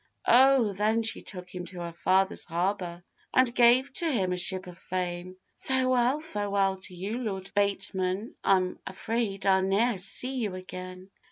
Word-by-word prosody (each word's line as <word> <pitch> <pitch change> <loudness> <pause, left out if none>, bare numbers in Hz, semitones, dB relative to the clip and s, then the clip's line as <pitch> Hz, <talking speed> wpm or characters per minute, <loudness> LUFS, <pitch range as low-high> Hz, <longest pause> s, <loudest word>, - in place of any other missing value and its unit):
O! 255 -3 +5
then 215 +3 +1
she 225 - 0
took 180 -2 -7
him 180 -1 -6
to 180 -2 -7
her 170 -1 -6
father's 190 +3 +1
harbour, 175 0 -2 0.3
And 255 -2 +4
gave 245 +3 +4
to 335 -2 +1
him 190 -8 0
a - - -1
ship 185 +1 +1
of 180 -1 -10
fame; 180 0 -4 0.2
'Farewell, 255 +1 +1
farewell 200 -8 0
to 185 -1 -5
you, 200 +7 -4
Lord 195 -5 -4
Bateman, 195 0 -1
I'm 185 -2 +2
afraid 215 0 -3
I 190 -1 +4
ne'er 195 +5 +2
shall 215 - -4
see 255 +8 +1
you 210 -6 -2
again. 185 0 -9
195 Hz, 165 wpm, -28 LUFS, 185-230 Hz, 0.3 s, O